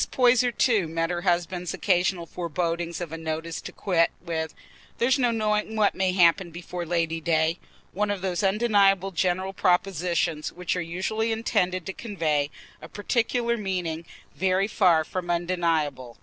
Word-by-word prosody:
Poyser, 250 Hz, -1 st, +4 dB
too, 225 Hz, -7 st, +2 dB
met 165 Hz, +1 st, -1 dB
her 175 Hz, -1 st, -2 dB
husband's 175 Hz, 0 st, -1 dB
occasional 180 Hz, -2 st, +1 dB
forebodings 170 Hz, 0 st, -3 dB
of 170 Hz, -3 st, -5 dB
a 165 Hz, -, -5 dB
notice 160 Hz, +1 st, -4 dB
to -, -, -8 dB
quit 170 Hz, -4 st, +2 dB
with 160 Hz, -2 st, -4 dB, 0.4 s
"There's 260 Hz, +4 st, +2 dB
no 245 Hz, -2 st, +3 dB
knowing 215 Hz, -1 st, 0 dB
what 215 Hz, -2 st, +3 dB
may 190 Hz, -1 st, +1 dB
happen 175 Hz, 0 st, +4 dB
before 175 Hz, +1 st, -6 dB
Lady 165 Hz, -1 st, 0 dB
day"—one 170 Hz, +5 st, -1 dB
of 200 Hz, -2 st, -2 dB
those 185 Hz, 0 st, -1 dB
undeniable 195 Hz, -2 st, +3 dB
general 185 Hz, +2 st, 0 dB
propositions 175 Hz, -4 st, 0 dB
which 180 Hz, 0 st, -3 dB
are 180 Hz, -, -1 dB
usually 190 Hz, +7 st, -2 dB
intended 185 Hz, -6 st, 0 dB
to 190 Hz, -, -4 dB
convey 155 Hz, -11 st, -1 dB, 0.3 s
a -, -, -10 dB
particular 235 Hz, +2 st, 0 dB
meaning 180 Hz, -5 st, -3 dB, 0.3 s
very 190 Hz, +1 st, +1 dB
far 180 Hz, -7 st, +3 dB
from 175 Hz, +2 st, -5 dB
undeniable. 165 Hz, -8 st, -1 dB
180 Hz, 150 wpm, -26 LUFS, 165-200 Hz, 0.4 s, Poyser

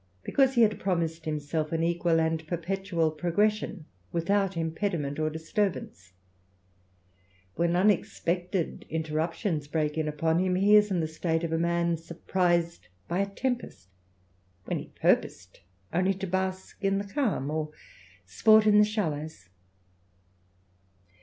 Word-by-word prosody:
because 270 Hz, -1 st, +2 dB
he 235 Hz, -, +6 dB
had 215 Hz, -1 st, +2 dB
promised 165 Hz, -3 st, -1 dB
himself 155 Hz, 0 st, -2 dB
an 165 Hz, 0 st, 0 dB
equal 170 Hz, -1 st, +2 dB
and 160 Hz, 0 st, -1 dB
perpetuaL 175 Hz, -1 st, -1 dB
progression 180 Hz, +2 st, 0 dB, 0.3 s
without 195 Hz, +2 st, 0 dB
impediment 160 Hz, -3 st, -2 dB
or 155 Hz, 0 st, +1 dB
disturbance; 160 Hz, -, -3 dB, 1.4 s
wheiK 170 Hz, 0 st, +1 dB
unexpected 180 Hz, -2 st, 0 dB
interruptions 160 Hz, +1 st, -2 dB
break 150 Hz, 0 st, -1 dB
in 155 Hz, -, -1 dB
upon 160 Hz, +2 st, +1 dB
him, 185 Hz, 0 st, +1 dB
he 200 Hz, +3 st, +5 dB
is 210 Hz, 0 st, +6 dB
in 180 Hz, -3 st, 0 dB
the 160 Hz, -, -1 dB
state 160 Hz, +1 st, -1 dB
of 165 Hz, -1 st, -2 dB
a 165 Hz, -, +1 dB
man 170 Hz, 0 st, +1 dB
surprised 170 Hz, +1 st, -1 dB, 0.2 s
by 175 Hz, +2 st, -1 dB
a 200 Hz, 0 st, 0 dB
tempest, 235 Hz, -, -4 dB, 0.8 s
where -, -, -2 dB
he -, -, -9 dB
purposed 90 Hz, 0 st, 0 dB, 0.3 s
only 185 Hz, +3 st, +2 dB
to 195 Hz, +1 st, -4 dB
bask 190 Hz, +2 st, -3 dB
in 195 Hz, 0 st, +2 dB
the 200 Hz, -, -1 dB
calm, 200 Hz, -, -1 dB
or 155 Hz, 0 st, -2 dB, 0.6 s
sport 215 Hz, -, +5 dB
in 210 Hz, -1 st, +6 dB
the -, -, +7 dB
shallows. 155 Hz, -, -3 dB
170 Hz, 135 wpm, -28 LUFS, 160-195 Hz, 1.4 s, the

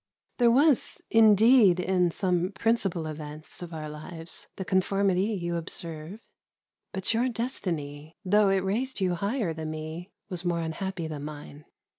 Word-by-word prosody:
There 240 Hz, -1 st, +6 dB
was 280 Hz, +3 st, +3 dB
indeed 220 Hz, -2 st, +6 dB
in 180 Hz, -1 st, +2 dB
some 180 Hz, +1 st, 0 dB
principal 195 Hz, -5 st, 0 dB
events 155 Hz, +1 st, -8 dB
of 175 Hz, -1 st, -7 dB
our 155 Hz, -2 st, -5 dB
lives 160 Hz, +2 st, -8 dB
the 190 Hz, -, -5 dB
conformity 190 Hz, 0 st, +2 dB
you 175 Hz, -6 st, -2 dB
observe. 165 Hz, +3 st, -6 dB, 0.7 s
But 190 Hz, +3 st, -1 dB
your 240 Hz, +3 st, +2 dB
destiny, 165 Hz, -, -4 dB
though 205 Hz, +2 st, +4 dB
it 195 Hz, -1 st, +2 dB
raised 235 Hz, +7 st, -1 dB
you 185 Hz, -2 st, +1 dB
higher 200 Hz, 0 st, -1 dB
than 160 Hz, 0 st, -5 dB
me, 155 Hz, +4 st, -6 dB, 0.2 s
was 180 Hz, -3 st, -3 dB
more 170 Hz, -2 st, 0 dB
unhappy 170 Hz, +2 st, -4 dB
than 150 Hz, -2 st, -5 dB
mine. 150 Hz, 0 st, -9 dB
180 Hz, 145 wpm, -27 LUFS, 160-205 Hz, 0.7 s, There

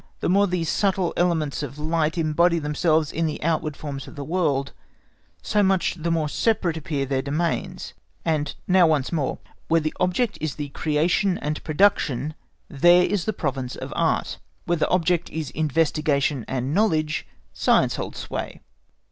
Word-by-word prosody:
The -, -, -1 dB
more 200 Hz, +2 st, +4 dB
these 180 Hz, -3 st, -1 dB
subtle 190 Hz, -1 st, +1 dB
elements 160 Hz, -5 st, 0 dB
of 140 Hz, -1 st, -6 dB
light 160 Hz, +2 st, 0 dB
embody 170 Hz, +2 st, +3 dB
themselves 155 Hz, 0 st, +1 dB
in 165 Hz, 0 st, 0 dB
the 155 Hz, -, -4 dB
outward 155 Hz, -2 st, -1 dB
forms 140 Hz, -3 st, -6 dB
of -, -, -11 dB
the 145 Hz, -, -5 dB
world, 140 Hz, -4 st, 0 dB, 0.7 s
so 210 Hz, -, +2 dB
much 190 Hz, -2 st, +2 dB
the 170 Hz, -1 st, -3 dB
more 165 Hz, -2 st, +1 dB
separate 180 Hz, 0 st, 0 dB
appear 145 Hz, -3 st, -2 dB
their 135 Hz, 0 st, 0 dB
domains; 155 Hz, +5 st, -2 dB, 0.3 s
and 150 Hz, -3 st, 0 dB
now 185 Hz, -2 st, +5 dB
once 150 Hz, -4 st, +1 dB
more, 150 Hz, -6 st, -1 dB, 0.3 s
where 165 Hz, +1 st, +4 dB
the 155 Hz, 0 st, -2 dB
object 190 Hz, +6 st, 0 dB
is 155 Hz, -3 st, -2 dB, 0.2 s
creation 170 Hz, +5 st, +1 dB
and 150 Hz, +1 st, -4 dB
production, 155 Hz, -4 st, +2 dB, 0.3 s
there 175 Hz, +4 st, +5 dB
is 195 Hz, -2 st, 0 dB
the 215 Hz, -, +1 dB
province 135 Hz, -8 st, -3 dB
of -, -, -7 dB
Art; -, -, 0 dB, 0.3 s
where 175 Hz, -, +1 dB
the -, -, +1 dB
object 175 Hz, -1 st, +1 dB
is 155 Hz, -4 st, -4 dB
investigation 150 Hz, -3 st, +1 dB
and 130 Hz, +2 st, -2 dB
knowledge 155 Hz, -6 st, +1 dB, 0.3 s
Science -, -, +2 dB
holds -, -, -5 dB
sway. -, -, -5 dB
160 Hz, 160 wpm, -24 LUFS, 150-175 Hz, 0.7 s, now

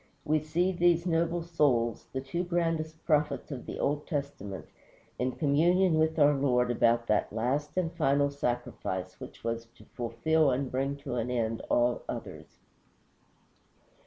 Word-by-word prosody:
We 155 Hz, +1 st, +2 dB
see 165 Hz, +5 st, 0 dB
these 175 Hz, -1 st, +3 dB
noble 170 Hz, 0 st, +1 dB
souls, 130 Hz, -9 st, +1 dB
the 130 Hz, -, -3 dB
two 170 Hz, +7 st, -3 dB
grandest 165 Hz, -2 st, -2 dB
prophets 150 Hz, -2 st, +1 dB
of 130 Hz, -3 st, -6 dB
the -, -, -5 dB
Old 145 Hz, +1 st, -1 dB
Testament, 140 Hz, -, -4 dB, 0.5 s
in 125 Hz, 0 st, 0 dB
communion 165 Hz, +3 st, +3 dB
with 160 Hz, +1 st, +2 dB
our 145 Hz, -1 st, +6 dB
Lord 125 Hz, -3 st, +2 dB
about 120 Hz, 0 st, +2 dB
that 105 Hz, -2 st, +1 dB
last 130 Hz, -, -1 dB
and 175 Hz, -3 st, 0 dB
final 140 Hz, +1 st, +2 dB
sacrifice 120 Hz, -8 st, -3 dB
which -, -, -10 dB
was 115 Hz, 0 st, -3 dB
to -, -, -17 dB
fulfill 140 Hz, +6 st, +1 dB
and 130 Hz, +1 st, -1 dB
bring 135 Hz, +2 st, -1 dB
to 125 Hz, -, -3 dB
an 120 Hz, +1 st, -1 dB
end 115 Hz, -2 st, -1 dB
all 120 Hz, 0 st, +2 dB
others. -, -, -7 dB
140 Hz, 150 wpm, -29 LUFS, 120-160 Hz, 0.5 s, our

